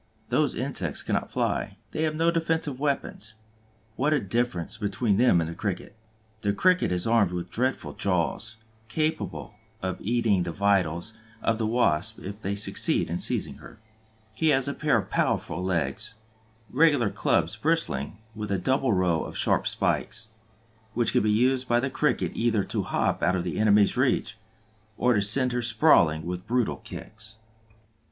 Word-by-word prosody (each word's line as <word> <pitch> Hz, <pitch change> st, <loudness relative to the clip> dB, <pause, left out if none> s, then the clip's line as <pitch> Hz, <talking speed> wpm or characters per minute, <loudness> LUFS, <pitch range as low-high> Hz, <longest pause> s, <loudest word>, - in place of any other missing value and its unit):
Those -, -, +2 dB
insects -, -, -3 dB
cannot -, -, -1 dB
fly, -, -, -2 dB
they 155 Hz, -, -3 dB
have 155 Hz, -1 st, 0 dB
no 165 Hz, +2 st, +2 dB
defensive 160 Hz, -5 st, -1 dB
weapons. 135 Hz, -6 st, -3 dB, 0.6 s
What 145 Hz, +6 st, +1 dB
a 150 Hz, -, +3 dB
difference 110 Hz, -3 st, -2 dB
between 105 Hz, 0 st, 0 dB
them 120 Hz, -7 st, +4 dB
and 80 Hz, -, -1 dB
the 85 Hz, -, -5 dB
Cricket! 95 Hz, +2 st, -4 dB, 0.5 s
The 100 Hz, -1 st, 0 dB
Cricket 180 Hz, -, +2 dB
is 90 Hz, -1 st, 0 dB
armed 115 Hz, -5 st, +3 dB
with 90 Hz, 0 st, -5 dB
dreadful 130 Hz, +3 st, -1 dB
jaws, 100 Hz, +4 st, -1 dB, 0.3 s
capable 155 Hz, -3 st, -2 dB, 0.3 s
of 95 Hz, -1 st, -2 dB
eating 110 Hz, -3 st, +1 dB
the 85 Hz, -1 st, -2 dB
vitals 95 Hz, 0 st, +1 dB, 0.3 s
out -, -, +1 dB
of 115 Hz, -, +1 dB
the 110 Hz, -, 0 dB
Wasp 110 Hz, -3 st, +1 dB
if 100 Hz, +3 st, -8 dB
they 100 Hz, 0 st, -2 dB
succeed 100 Hz, -4 st, +1 dB
in 85 Hz, -, -2 dB
seizing -, -, -1 dB
her; -, -, -13 dB, 0.6 s
he 160 Hz, +8 st, 0 dB
has 135 Hz, -3 st, +4 dB
a 140 Hz, -, -1 dB
pair 150 Hz, -5 st, +1 dB
of 105 Hz, -, -4 dB
powerful 85 Hz, +3 st, 0 dB
legs, 85 Hz, 0 st, -2 dB, 0.6 s
regular 145 Hz, -6 st, +3 dB
clubs -, -, +1 dB
bristling 70 Hz, +7 st, -1 dB, 0.2 s
with 105 Hz, -1 st, -5 dB
a 100 Hz, -, +1 dB
double 130 Hz, +1 st, +1 dB
row 90 Hz, -3 st, +1 dB
of -, -, -7 dB
sharp -, -, +2 dB
spikes, 110 Hz, 0 st, -1 dB, 0.7 s
which 120 Hz, -1 st, +2 dB
can -, -, +3 dB
be 105 Hz, -, +1 dB
used 125 Hz, +4 st, +2 dB
by 120 Hz, 0 st, +3 dB
the 130 Hz, +2 st, -2 dB
Cricket 150 Hz, +1 st, 0 dB
either 115 Hz, -3 st, +1 dB
to -, -, -2 dB
hop -, -, -1 dB
out 90 Hz, +1 st, +2 dB
of 90 Hz, -1 st, -2 dB
his 90 Hz, -, -3 dB
enemy's 105 Hz, -1 st, +4 dB
reach, 130 Hz, -2 st, +1 dB, 0.6 s
or 125 Hz, 0 st, +3 dB
to 105 Hz, -, +2 dB
send 125 Hz, +5 st, +4 dB
her 120 Hz, 0 st, -1 dB
sprawling 110 Hz, -, +4 dB
with 90 Hz, +2 st, -5 dB
brutal 120 Hz, -1 st, 0 dB
kicks. 110 Hz, 0 st, -10 dB
110 Hz, 170 wpm, -26 LUFS, 95-125 Hz, 0.7 s, them